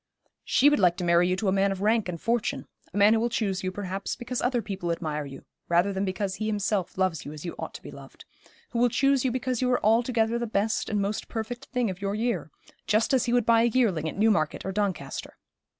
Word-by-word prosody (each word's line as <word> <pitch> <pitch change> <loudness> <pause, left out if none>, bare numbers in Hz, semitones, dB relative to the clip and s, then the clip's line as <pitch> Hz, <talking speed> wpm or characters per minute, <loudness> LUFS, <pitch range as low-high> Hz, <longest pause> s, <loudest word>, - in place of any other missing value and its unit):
'She 280 - +3
would 295 -4 +4
like 180 -3 +3
to 180 - -3
marry 170 0 +4
you 185 - +1
to 200 +2 -2
a - - +3
man 195 +1 +2
of 195 0 -4
rank 220 -2 +2
and 170 -2 -4
fortune 235 +2 -1 0.3
a - - -5
man 205 +2 +6
who 225 - +3
will 235 +2 0
choose 195 -5 -1
you, 185 - -1
perhaps, 195 0 -4
because 245 0 -4
other 245 0 +1
people 195 -6 -3
admire 150 -3 -3
you, 135 0 -11 0.2
rather 175 +4 +3
than 190 +1 -1
because 190 0 -2
he 215 - -3
himself 205 -4 -1
loves 185 -4 0
you 145 - -7
as 150 +2 -9
you 170 - -4
ought - - -6
to - - -10
be - - -9
loved; - - -13 0.5
who 235 - -1
will 245 +1 +4
choose 275 +2 +2
you 260 - +2
because 255 0 -2
you 250 - +2
are 250 - +1
altogether 230 +1 +2
the 235 - -2
best 215 +1 0
and 210 -2 0
most 205 +2 -3
perfect 240 +2 -5
thing 250 -2 -1
of 185 +1 -10
your 200 0 -1
year; 235 +2 -1 0.4
just 220 +4 +2
as 255 -2 +3
he 240 - -1
would 245 -2 +2
buy 230 0 +5
a - - +4
yearling 215 -10 +1
at - - -8
Newmarket 200 -9 +1
or 190 - -2
Doncaster. 190 -8 -3
210 Hz, 250 wpm, -27 LUFS, 185-235 Hz, 0.5 s, man